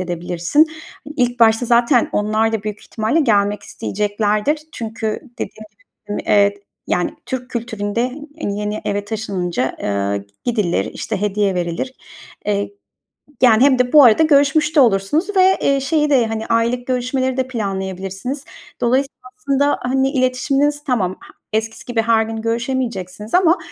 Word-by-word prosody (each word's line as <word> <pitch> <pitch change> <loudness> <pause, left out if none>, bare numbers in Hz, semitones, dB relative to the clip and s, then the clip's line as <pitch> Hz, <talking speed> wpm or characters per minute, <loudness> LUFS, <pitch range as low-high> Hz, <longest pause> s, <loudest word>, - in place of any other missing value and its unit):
edebilirsin. 175 - +1 0.5
İlk 245 -2 0
başta 225 +1 +4
zaten 240 +1 +3
onlar 215 +2 +1
da 220 -2 -1
büyük 210 -1 -5
ihtimalle 220 +9 -1
gelmek 205 -6 +2
isteyeceklerdir. 210 +7 -1
Çünkü 220 -1 -4 0.2
dediğim 215 - -6
gibi, - - -32 0.3
ııı, - - -2
evet, 205 0 +3 0.3
yani, 180 - 0
Türk 255 0 -5
kültüründe, 220 -2 -2 0.4
ııı, 200 - -1
yeni 210 +1 -3
eve 205 0 -1
taşınınca, 185 - -2
ııı, 100 0 -1 0.2
gidilir, 205 - 0
işte, 215 -4 -4
hediye 205 -1 0
verilir. 175 +9 -3 0.5
Eee, 200 -1 0 0.7
yani, 240 -1 +6
hem 270 -2 +4
de 250 0 +1
bu 295 -2 +9
arada 240 +6 +6
görüşmüş 305 +1 +3
de - - +8
olursunuz 265 - +2
ve, 375 0 +5
iii, 275 0 +2
şeyi 300 +2 +1
de, 255 -5 +4
hani, 220 0 -4
aylık 235 +2 0
görüşmeleri 255 +1 -1
de 260 -1 0
planlayabilirsiniz. 195 +3 -4 0.4
Dolayısıyla 260 +3 0 0.2
aslında, 285 -1 +1
hani, 265 +2 +1
iletişiminiz 275 +3 +1
tamam, 220 -10 0
h - - -15 0.3
eskisi 220 +1 -2
gibi 240 -2 0
her 225 0 +3
gün 225 0 -4
görüşemeyeceksiniz 230 -4 -3
ama, 360 -1 +4
230 Hz, 145 wpm, -19 LUFS, 205-265 Hz, 0.7 s, bu